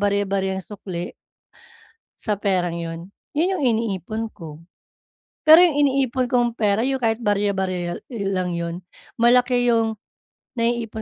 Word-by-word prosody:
barya-baryang 195 -2 0
sukli 185 -4 -6 1.1
sa 215 - -1
perang 185 -4 0
yon, 170 +2 -6 0.2
yun 350 +5 +2
yung 280 - 0
iniipon 220 +1 -3
ko. 160 -2 -11 0.8
Pero 315 +2 +9
yung 340 -5 +4
iniipon 265 -3 +2
kong 240 -1 +1
pera 210 0 +2
yung 265 +2 0
kahit 225 -1 0
barya-barya 190 -4 -1
i 225 -5 -4
lang 185 -2 -1
yon, 170 +1 -4 0.4
malaki 245 0 +4
yung 225 -1 +2 0.6
naiipon 230 -2 -1
210 Hz, 125 wpm, -22 LUFS, 190-240 Hz, 1.1 s, Pero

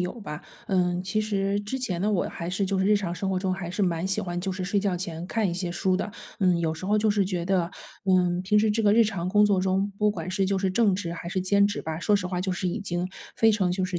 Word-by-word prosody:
有 180 0 -1
吧。 150 -7 -7 0.2
嗯， 180 -2 +1
其 190 +3 -1
实 200 -1 0
之 210 +6 -4
前 185 -9 -2
呢， 205 +3 +1
我 195 -4 +1
还 170 - -6
是 190 +2 0
就 195 +1 0
是 190 - +2
日 210 +1 +4
常 180 -4 -2
生 190 +2 -3
活 185 - 0
中， 185 0 -1
还 180 -2 -5
是 195 +3 -1
蛮 170 -2 0
喜 195 +2 0
欢 175 -3 -3
就 190 +2 -2
是 185 0 -3
睡 195 +1 +1
觉 195 -3 0
前 170 -2 -5
看 220 -3 0
一 - - -2
些 180 0 -3
书 185 +2 +1
的。 205 - -3 0.3
嗯， 180 -3 +3
有 165 -2 0
时 165 - -8
候 210 +2 +3
就 215 +1 +2
是 205 -1 +2
觉 180 -2 -2
得， 180 -2 +1 0.3
嗯， 180 -2 +3
平 210 +3 +3
时 215 +1 +3
这 225 +2 0
个 205 -1 +5
日 230 +1 +6
常 185 -5 -2
工 210 +2 +5
作 200 -2 +2
中， 190 +2 +1
不 210 0 +3
管 170 -4 -5
是 190 +1 +1
就 195 0 +1
是 190 0 0
正 210 +1 +3
职 175 -3 -3
还 170 0 -6
是 185 0 -1
兼 200 +2 +4
职 205 - -3
吧， 160 0 -4
说 205 +3 +3
实 185 -2 -3
话 180 -1 -2
就 190 - -1
是 180 0 -2
已 180 +5 -2
经 180 -2 -2 0.3
非 225 0 +5
常 195 -4 +1
就 185 +1 0
是 185 -1 -2
190 Hz, 320 characters per minute, -26 LUFS, 180-205 Hz, 0.3 s, 日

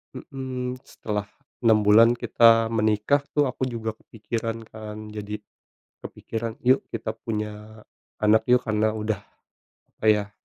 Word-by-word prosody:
mhm, 130 -2 -5
setelah 105 -1 -5 0.3
6 110 -3 +4
bulan 115 +3 +7
kita 115 -1 +5
menikah 110 +6 +2
tuh 145 -1 +3
aku 130 0 -3
juga 110 -2 -4
kepikiran 115 0 -5
kan. 110 -1 -9 0.2
Jadi 105 0 -5 0.7
kepikiran, 115 0 -5 0.2
yuk 130 - +4
kita - - -4
punya 105 0 -6 0.4
anak 110 +1 +4
yuk, 125 0 +6
karena 110 0 +1
udah 110 -2 -2 0.8
kayak 105 -2 +2
110 Hz, 120 wpm, -25 LUFS, 105-115 Hz, 0.8 s, bulan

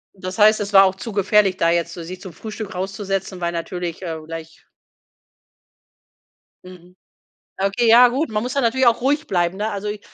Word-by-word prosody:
Das 185 +1 -7
heißt, 215 +1 +5
es 205 0 -4
war 195 0 +8
auch 190 - +1
zu 225 +3 -7
gefährlich, 200 -1 +2
da 165 0 +2
jetzt 170 0 0
so 170 - -8
sich 180 +2 -9
zum 185 -4 -10
Frühstück 215 0 -8
rauszusetzen, 195 -1 -4
weil 170 0 -1
natürlich, 175 +1 -5
äh, 165 -2 -4
gleich 165 0 -10 2.0
Mhm. 180 0 -15 0.7
Okay, 200 +5 +1
ja 245 +2 +8
gut, 265 +2 -2
man 210 0 -1
muss 250 +2 -4
da 280 - +1
natürlich 255 +1 +1
auch 235 +1 +4
ruhig 290 +4 0
bleiben, 175 0 0
ne? 215 +1 -2
Also, 205 +1 -4
i 210 0 -5
195 Hz, 190 wpm, -20 LUFS, 180-220 Hz, 2.0 s, war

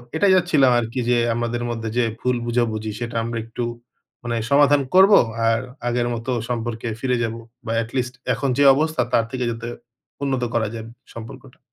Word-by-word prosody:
এটাই 190 +4 +4
চাচ্ছিলাম 145 -7 +4
আরকি 115 +2 -3
যে 125 - +4 0.2
আমাদের 120 0 -2
মধ্যে 115 -1 -3
যে - - +4 0.2
ভুল 125 0 0
বোঝাবুঝি, 115 -2 -1
সেটা 120 -1 -5
আমরা 115 0 -3
একটু 115 +1 -4 0.6
মানে 120 -1 -2 0.2
সমাধান 145 0 +5
করব। 190 +2 +7 0.4
আর 115 0 +3 0.3
আগের 120 0 0
মতো 120 +2 -4 0.2
সম্পর্কে 115 -1 -3
ফিরে 125 0 0
যাব 115 - -2 0.3
বা 115 - -3
এটলিস্ট 125 +2 -3 0.2
এখন 135 +3 -1
যে 145 - +4
অবস্থা, 155 -1 0
তার 115 - +3
থেকে 125 -1 -2
যাতে 115 0 -6 0.6
উন্নত 130 -3 0
করা 110 -2 +1
যায় 110 -1 -6
ব - - -11 0.2
সম্পর্কটা। 125 +3 -11
120 Hz, 175 wpm, -22 LUFS, 115-130 Hz, 0.6 s, করব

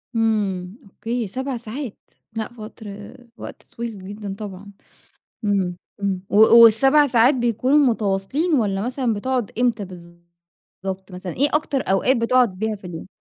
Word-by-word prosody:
إمم، 205 -3 0
أوكي، 225 +3 -4
7 260 +4 -3
ساعات! 235 +1 -6 0.4
لأ 220 -1 -3
وقت 220 +1 -10 0.5
وقت - - -9 0.2
طويل 220 -5 -6
جدًا 205 -1 -6
طبعًا، 200 -1 -8 0.7
إمم، 190 -4 0 0.3
إمم، 190 -2 -1
و 200 - -1 0.3
وال7 270 +7 +6
ساعات 245 +2 +4
بيكونوا 250 +4 +2
متواصلين 240 - +1
والّا 200 -6 +1
مثلًا 245 -2 -1
بتقعُد 245 0 -2
إمتى 235 -4 +1
بالضبط 170 -1 -15 0.7
مثلًا، 180 -1 -6
إيه 285 +3 +2
أكتر 295 -3 0
أوقات 240 +7 +3
بتقعُد 230 -4 +2
بيها 220 0 -1
في 195 - -12
اليوم؟ 165 -1 -7
220 Hz, 135 wpm, -22 LUFS, 195-250 Hz, 0.7 s, وال7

